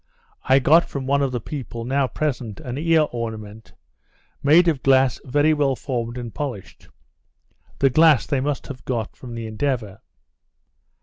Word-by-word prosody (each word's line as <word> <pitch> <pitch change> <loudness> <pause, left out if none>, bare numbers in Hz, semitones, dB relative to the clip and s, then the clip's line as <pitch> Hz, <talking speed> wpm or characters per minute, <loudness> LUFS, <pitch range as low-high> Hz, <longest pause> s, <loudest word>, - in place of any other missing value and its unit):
I 130 - +5
got 155 +6 +5
from 140 -2 -6
one 140 +1 +1
of 135 -2 0
the 125 - -2
people, 120 -2 -6
now 135 +1 +1
present, 125 -8 -3
an 125 -1 -6
ear 160 -1 +3
ornament, 110 -2 -7 0.7
made 160 +5 +5
of 150 -6 +1
glass 135 -2 +3
very 145 +4 +2
well 145 -3 +1
formed 120 -1 -4
and 120 -2 -6
polished. 130 -10 -7 0.9
The 135 -1 +3
glass 155 -4 +5
they 140 -3 -1
must 145 0 -2
have 130 -3 -9
got 115 -4 -3
from 120 -2 -9
the 115 -1 -5
Endeavour. 110 -3 -3
130 Hz, 160 wpm, -22 LUFS, 115-145 Hz, 0.9 s, I